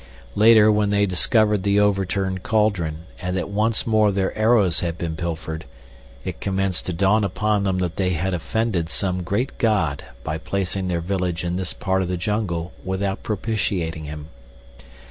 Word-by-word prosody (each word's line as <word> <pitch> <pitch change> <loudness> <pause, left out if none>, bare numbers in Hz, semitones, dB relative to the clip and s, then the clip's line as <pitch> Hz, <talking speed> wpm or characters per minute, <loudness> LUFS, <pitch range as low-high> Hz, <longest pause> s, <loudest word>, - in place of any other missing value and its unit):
Later, 110 0 +6
when 105 -1 +2
they 100 0 +3
discovered 105 +2 +2
the 100 +1 +2
overturned 95 -2 +1
cauldron, 95 -8 0 0.2
and 90 0 -2
that 95 - -3
once 110 +2 +1
more 110 -2 +3
their 95 -1 -1
arrows 110 -6 +3
had 85 -1 -2
been 80 -2 -3
pilfered, 80 -1 -4 0.6
it - - -5
commenced 95 -2 -1
to 90 - -1
dawn 100 +5 +3
upon 105 +1 0
them 95 -1 +1
that 90 -1 -2
they 95 -2 +1
had 90 +3 -1
offended 90 -1 -1
some 90 +1 -1
great 100 +9 -1
god 85 -11 +1 0.2
by 80 +1 -3
placing 95 +2 -2
their 85 -2 -1
village 90 -1 -2
in 90 0 -1
this 95 -1 -3
part 95 -1 0
of 90 - -1
the 90 0 -2
jungle 90 -3 -2
without 95 +1 -2
propitiating 95 -7 -2
him. 75 0 -7
95 Hz, 165 wpm, -22 LUFS, 85-105 Hz, 0.6 s, Later